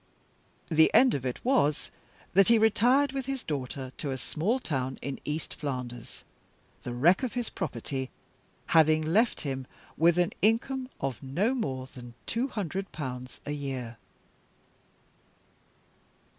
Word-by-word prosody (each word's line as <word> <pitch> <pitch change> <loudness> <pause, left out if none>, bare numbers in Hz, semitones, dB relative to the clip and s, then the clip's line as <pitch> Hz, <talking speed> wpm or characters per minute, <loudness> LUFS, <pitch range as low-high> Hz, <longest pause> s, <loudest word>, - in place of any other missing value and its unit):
The 160 -1 +5
end 255 0 +7
of 130 -2 -1
it 125 - -5
was 200 - +2 0.4
that 195 0 +6
he 230 - +6
retired, 245 +6 +4
with 270 -1 -4
his 270 -2 -3
daughter, 135 -2 -4
to 145 - -3
a 135 - -2
small 175 - -1
town 130 - -3
in 140 -1 -4
East 150 +1 -3
Flanders; 125 -4 -6 0.6
the 120 - -5
wreck 160 - +4
of 255 -3 -2
his 245 -2 -3
property 130 -4 -3 0.6
having 155 -1 +5
left 210 +10 +2
him 135 -3 -4 0.3
with 170 +1 +4
an 175 -1 +2
income 255 +5 +1
of 135 -3 -3
no 170 - 0
more 135 - -2
than 120 -2 -12
two 235 +4 0
hundred 195 - -4
pounds 125 -4 -6
a 145 - -3
year." 130 -5 -4
155 Hz, 140 wpm, -29 LUFS, -, 0.6 s, end